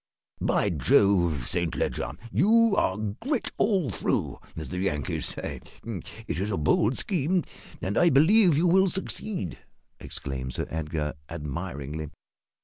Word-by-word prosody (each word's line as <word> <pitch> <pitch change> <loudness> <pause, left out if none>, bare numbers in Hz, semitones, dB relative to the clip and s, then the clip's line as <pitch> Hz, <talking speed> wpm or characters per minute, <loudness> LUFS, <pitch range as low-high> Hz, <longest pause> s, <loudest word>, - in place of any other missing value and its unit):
"By - - +2
Jove, 85 -1 +3
Saint 85 -1 -1
Leger, - - -1 0.2
you 225 - +4
are 95 - +1
`grit 110 - -2
all 185 - +2
through,' - - -1 0.2
as 80 - -5
the 90 - -3
Yankees 75 -8 -1
say. - - -5 0.2
It - - -5
is 100 +2 -1
a 100 - -1
bold 105 - +2
scheme, 180 -1 +1 0.4
and 95 +2 -1
I 175 - +6
believe 170 +4 +5
you 165 - +3
will 190 +2 +5
succeed," 190 - -3 0.4
exclaimed 65 -2 -5
Sir - - -1
Edgar, 75 -1 -2 0.2
admiringly. 75 +1 -5
100 Hz, 135 wpm, -27 LUFS, -, 0.4 s, I